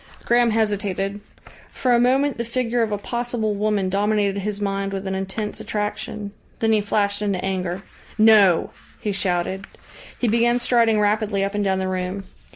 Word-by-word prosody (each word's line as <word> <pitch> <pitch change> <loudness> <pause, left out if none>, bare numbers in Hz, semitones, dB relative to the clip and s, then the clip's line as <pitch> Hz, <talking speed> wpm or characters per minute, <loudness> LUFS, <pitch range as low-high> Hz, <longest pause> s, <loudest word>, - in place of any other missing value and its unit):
Graham 240 0 +4
hesitated. 205 -2 -1 0.5
For 250 -2 0
a 240 - +5
moment 265 +2 +2
the - - 0
figure 240 0 -1
of 225 -2 0
a 205 - 0
possible 235 0 -2
woman 205 -1 0
dominated 200 +1 +1
his 205 +1 -3
mind 195 -1 -2
with 195 0 -4
an 190 - -2
intense 195 +3 -4
attraction. 210 0 -4 0.3
Then 225 0 +1
he 215 - +3
flashed 205 0 0
into 195 -3 -1
anger. 185 0 -2 0.3
"No!" 215 -5 +5 0.3
he 210 - -2
shouted. 190 0 -1 0.5
He 245 - 0
began 235 +2 +3
striding 235 -3 +3
rapidly 210 -1 +1
up 200 +1 -2
and 205 0 0
down 190 -1 +1
the 190 0 -1
room. 185 +1 -3
205 Hz, 165 wpm, -22 LUFS, 195-225 Hz, 0.5 s, a